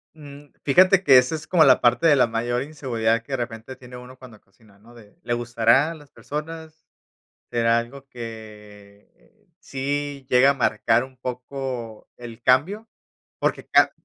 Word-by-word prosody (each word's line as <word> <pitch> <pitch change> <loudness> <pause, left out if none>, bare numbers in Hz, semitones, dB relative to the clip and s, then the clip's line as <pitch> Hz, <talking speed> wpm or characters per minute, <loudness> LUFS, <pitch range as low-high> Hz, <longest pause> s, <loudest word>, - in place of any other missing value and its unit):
Mm, 145 -1 -14
fíjate 185 +6 +4
que 135 -5 +7
esa 125 +5 +2
es 155 0 -9
como 175 -3 +4
la 135 -3 +5
parte 120 +6 +3
de 150 - +5
la 130 - +4
mayor 120 +2 -2
inseguridad 115 -6 -2
que 135 - -9
de 135 - 0
repente 120 +1 -7
tiene 125 -1 -12
uno 125 +1 -13
cuando 120 -5 -15
cocina, 100 +1 -26
¿no?, 115 +3 -19
de 105 -3 -18
¿le 120 - -2
gustará 120 +5 +2
a - - -6
las 150 -3 -17
personas? 160 +1 -8 0.7
¿Será 115 0 +2
algo 135 +4 -10
que 110 - -13
sí 140 -1 -4
llega 125 +2 +5
a - - -1
marcar 115 -1 +1
un 130 0 -14
poco 125 -2 -6
el 120 -1 -11
cambio?, 170 - +1 0.5
porque - - -2
claro - - +4
125 Hz, 165 wpm, -23 LUFS, 115-145 Hz, 0.7 s, que